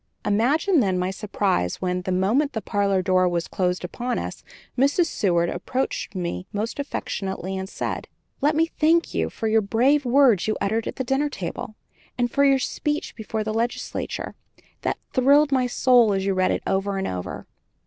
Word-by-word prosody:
Imagine, 285 - +3
then, 190 -6 +1
my 180 +1 -1
surprise 190 - -1
when, 180 0 -1
the 185 - -3
moment 220 +11 +1
the 220 - -1
parlor 200 -3 +1
door 185 0 +3
was 170 -1 -2
closed 180 -1 -1
upon 245 +7 -3
us, - - -5 0.3
Mrs. 280 +7 +3
Seward, 175 - +1
approaching 255 -4 -3
me 130 - -4
most 215 +6 -3
affectionately, 190 -8 -3
said: - - -4 0.3
"Let 295 +1 +3
me 325 +1 +4
thank 330 +1 +1
you - - 0
for 225 - -4
the 220 0 +3
brave 250 +8 +2
words 250 -6 +4
you 215 - 0
uttered 220 +3 -1
at - - -4
the 260 - -2
dinner 270 +4 0
table, 195 -1 -6 0.4
and 245 -1 0
for 280 - +2
your 275 -1 +5
speech 295 +3 -2
before 220 -1 -3
the 215 0 -3
legislature, 235 +2 -3 0.5
that - - -1 0.2
thrilled 285 +3 +4
my 255 -2 +2
soul 245 -3 +4
as 195 0 -1
I 195 - +1
read 185 -1 +2
it - - -1
over 195 +1 0
and 190 - -2
over." 90 -1 -5
220 Hz, 180 wpm, -24 LUFS, 190-270 Hz, 0.5 s, your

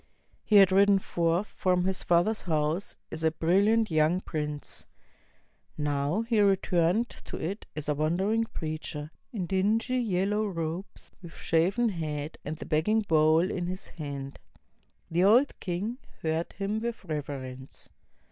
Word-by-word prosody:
He 215 - +1
had 195 -2 +8
ridden 200 +1 +5
forth 170 0 0
from 180 -3 0
his 190 0 -1
father's 175 +6 +2
house 160 +2 -1 0.2
as 160 0 -5
a 160 - +5
brilliant 200 +7 +2
young 155 +3 +3
prince. 150 - -4 0.9
He 150 - -3
now 145 +9 0
re 205 -3 +5
turned 180 +5 +1
to - - -9
it 190 +7 -4
as 150 -1 -5
a 150 - +2
wandering 190 +10 +1
preacher, 155 -4 -5 0.2
in 205 -8 -3
dingy 215 +7 +1
yellow 210 -1 0
robes, 170 0 -5
with 170 -3 -11
shaven 190 +9 +2
head 155 -4 -4
and 155 +2 -5
the - - -7
begging 170 +8 +2
bowl 160 -4 +4
in 175 -1 -2
his 185 +1 -4
hand. 140 -3 -6 0.7
The 175 +2 +2
old 240 +8 +4
king 200 +7 -3 0.2
heard 160 +1 -1
him 200 +2 -2
with 235 -3 -4
reverence. 135 -4 -6
175 Hz, 145 wpm, -28 LUFS, 155-200 Hz, 0.9 s, had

